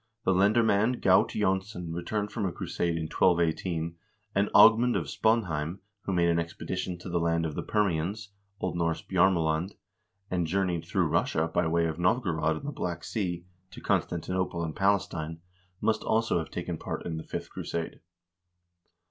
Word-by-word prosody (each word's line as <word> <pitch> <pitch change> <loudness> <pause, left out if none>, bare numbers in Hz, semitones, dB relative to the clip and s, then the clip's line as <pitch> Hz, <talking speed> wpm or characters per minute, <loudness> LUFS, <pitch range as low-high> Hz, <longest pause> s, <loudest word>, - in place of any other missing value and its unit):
The 95 - +4
lendermand 110 +4 +3
Gaut 95 -1 +5
Jonsson 95 -3 -1
returned 105 +5 -2
from 105 -5 -1
a - - -2
crusade 85 0 -2
in 80 - -2
1218, 85 0 +1 0.4
and 100 +1 +2
Agmund 115 +1 +7
of 85 - -2
Spaanheim, 85 -4 0 0.3
who - - -1
made 85 -1 +3
an 85 0 +2
expedition 90 +2 -4
to 90 - -10
the 85 -1 0
land 85 0 +1
of 80 - -3
the - - -3
Permians 100 0 -1 0.3
(0. 95 - -1
N. - - -5 0.3
Bjarmeland) 85 -1 +2 0.6
and 90 -2 0
journeyed 90 -1 0
through - - +1
Russia 80 +1 +1
by 85 +1 0
way 85 +1 +2
of 80 0 -3
Novgorod 85 -5 +1
and 135 - -7
the - - -2
Black 85 - -4
Sea, 90 -5 -3 0.2
to 90 - -11
Constantinople 90 0 -1
and 80 -2 -4
Pales 100 0 +2
tine, 80 -2 -5 0.4
must 110 +1 +1
also 110 -5 +1
have 80 - -5
taken - - -4
part - - -5
in 80 -2 -3
the 80 - -5
fifth - - -6
crusade. 85 -1 -4
90 Hz, 165 wpm, -28 LUFS, 85-100 Hz, 0.6 s, Agmund